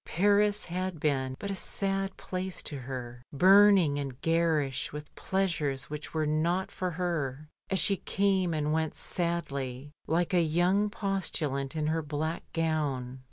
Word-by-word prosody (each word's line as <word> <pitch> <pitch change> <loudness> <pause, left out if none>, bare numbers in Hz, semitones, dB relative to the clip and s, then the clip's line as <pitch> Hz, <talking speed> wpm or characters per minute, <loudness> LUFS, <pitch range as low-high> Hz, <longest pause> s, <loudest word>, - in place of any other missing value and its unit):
Paris 205 +3 +2
had 180 -1 -3
been 135 -3 0
but 200 - -4
a - - -2
sad 195 0 -2
place 185 0 -4
to 150 - -5
her, 125 -2 -6
burning 185 -2 +6
and 135 -2 -5
garish 165 -5 +1
with 150 0 -8
pleasures 160 -9 -1
which 150 0 -6
were 155 -1 0
not 165 +5 0
for 185 - -2
her, 155 -5 -2 0.2
as 190 - +1
she 195 +3 +3
came 195 -3 +1
and 150 -1 0
went 160 -1 -1
sadly 140 -6 -2 0.2
like 170 +3 +1
a 175 - +5
young 175 +6 +2
postulant 165 -10 -2
in 155 -1 -1
her 160 +1 +1
black 155 +2 -3
gown. 145 -6 -1
165 Hz, 150 wpm, -29 LUFS, 145-185 Hz, 0.2 s, burning